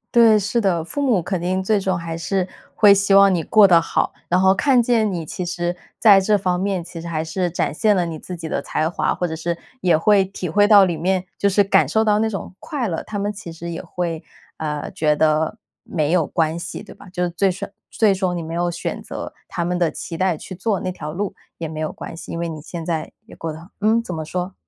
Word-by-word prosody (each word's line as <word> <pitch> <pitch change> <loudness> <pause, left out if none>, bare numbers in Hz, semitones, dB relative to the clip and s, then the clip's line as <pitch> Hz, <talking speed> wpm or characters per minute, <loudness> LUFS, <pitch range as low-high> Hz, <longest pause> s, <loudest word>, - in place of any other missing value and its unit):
对， 225 -2 +7
是 205 +4 0
的， 180 -5 +1
父 285 - -4
母 245 -9 +2
肯 185 +1 -3
定 185 +2 0
最 210 +3 +2
终 190 -3 -1
还 165 -1 -5
是 185 +2 -1 0.3
会 205 -2 +7
希 200 0 +2
望 195 -1 +7
你 165 - -1
过 210 +3 +6
得 170 -3 +6
好， - - -1 0.2
然 180 - +3
后 190 +1 +5
看 260 +3 +4
见 225 -3 +2
你 170 -3 -4
其 180 +4 -5
实 175 0 -2 0.2
在 200 -4 +7
这 205 +2 +3
方 180 -2 0
面， 190 0 -1
其 165 0 -9
实 170 - -7
还 155 -2 -1
是 175 +2 -2
展 160 - -1
现 215 +5 +3
了 180 -3 +1
你 165 -2 -5
自 180 +3 -8
己 165 - -6
的 140 - -2
才 155 +2 -1
华， 175 - 0
或 180 - -2
者 160 - -4
是 170 +1 -3 0.2
也 175 -6 +4
会 200 +3 +4
体 190 -1 -6
会 205 +4 +3
到 205 -2 +8
里 175 -2 -1
面， 185 +3 0
就 200 - +2
是 200 +1 +3
感 175 -5 +4
受 220 - +2
到 210 -1 +3
那 220 0 +1
种 195 -3 -6
快 265 -7 -3
乐， 165 -3 -3
他 210 -1 -5
们 205 +1 -1
其 195 -4 -9
实 165 +1 -7
也 165 - -5
会， 170 -2 -4 0.3
呃， 150 -2 -4
觉 150 -1 +1
得 155 +5 +2 0.3
没 155 -4 -1
有 175 -4 +3
关 160 0 0
系， 170 - -6
对 - - -12
吧？ 200 - -14
就 180 - -4
是 180 - +1
最终 185 +2 -1 0.2
最 215 -3 +3
终 185 -2 -1
你 - - -3
没 165 0 -6
有 175 +1 0
选 170 - -4
择 - - -7 0.2
他 170 - -2
们 180 +1 -1
的 170 -3 +1
期 165 - -7
待 180 -2 +1
去 185 - -9
做 195 +1 -1
那 185 - -3
条 150 -3 -6
路 195 +4 -3 0.2
也 165 - -4
没 155 0 -8
有 155 0 -2
关 - - -8
系， 165 - -9
因 165 - -4
为 170 - -2
你 155 -2 -6
现 165 0 -7
在 160 -2 -2
也 - - -14
过 165 - -4
得 155 - -8
很 170 - -13
嗯， 220 +2 +3
怎 185 -7 -6
么 160 - -4
说？ 180 +4 -4
180 Hz, 280 characters per minute, -21 LUFS, 165-200 Hz, 0.3 s, 到